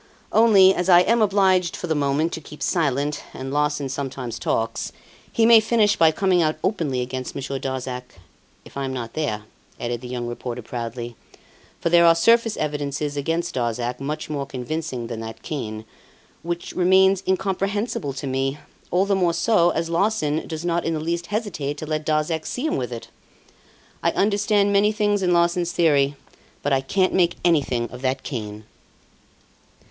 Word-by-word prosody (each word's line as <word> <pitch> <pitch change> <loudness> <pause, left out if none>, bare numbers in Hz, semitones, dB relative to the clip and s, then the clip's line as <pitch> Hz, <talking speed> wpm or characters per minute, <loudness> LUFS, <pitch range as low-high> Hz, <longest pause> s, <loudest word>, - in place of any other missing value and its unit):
Only, 200 -4 +6
as 180 0 -1
I 175 -1 +8
am 230 +5 +2
obliged 190 -4 +3
for - - -5
the 165 - 0
moment 145 +2 0
to 160 - -5
keep 150 0 -9
silent, 145 -4 0
and 135 +1 -5
Larsan 150 -1 0
sometimes 130 -3 -5
talks, 115 0 -1 0.4
he 225 - +3
may 230 0 +8
finish 220 -1 +2
by 165 - +5
coming 185 +1 +2
out 155 -1 +1
openly 155 -11 0
against 130 +1 -5
Monsieur 135 0 -4
Darzac, 125 -1 -5 0.5
if - - -15
I'm 135 -1 -3
not 120 -3 -5
there," 120 -9 -2 0.4
added 120 0 -3
the 125 - -7
young 125 -1 -4
reporter 120 0 -5
proudly. 120 0 -5 0.6
"For 170 - -1
there 170 0 +6
are 165 - +7
surface 230 +5 +3
evidences 145 -1 -2
against 165 +4 -1
Darzac, 120 0 -2
much 150 +3 -4
more 140 -2 -3
convincing 130 -1 -4
than 115 -1 -5
that 115 0 -8
cane, 110 -7 -5 0.6
which 170 +1 -4
remains 190 +1 +4
incomprehensible 195 - -1
to 140 - -6
me, 135 +1 -1 0.3
all 185 +2 +2
the 200 - +1
more 175 -3 +1
so 175 -1 +3
as 165 -1 -1
Larsan 170 -4 0
does 160 +1 -5
not 170 0 0
in 165 - -1
the - - -2
least 170 +2 -2
hesitate 180 -10 -3
to 155 - -6
let 155 0 -3
Darzac 155 +1 0
see 255 - -3
him 315 - 0
with 125 -1 -3
it! 115 -1 -7 0.9
I - - +2
understand 205 0 +2
many 205 +1 +4
things 205 -1 +1
in 180 -1 +2
Larsan's 175 0 +2
theory, 145 -4 +3 0.5
but 145 - +1
I 135 - +3
can't 185 +7 +1
make 175 -2 +3
anything 135 -8 +2
of 125 - -9
that 130 0 -1
cane. 105 -5 -5
155 Hz, 175 wpm, -23 LUFS, 130-185 Hz, 0.9 s, I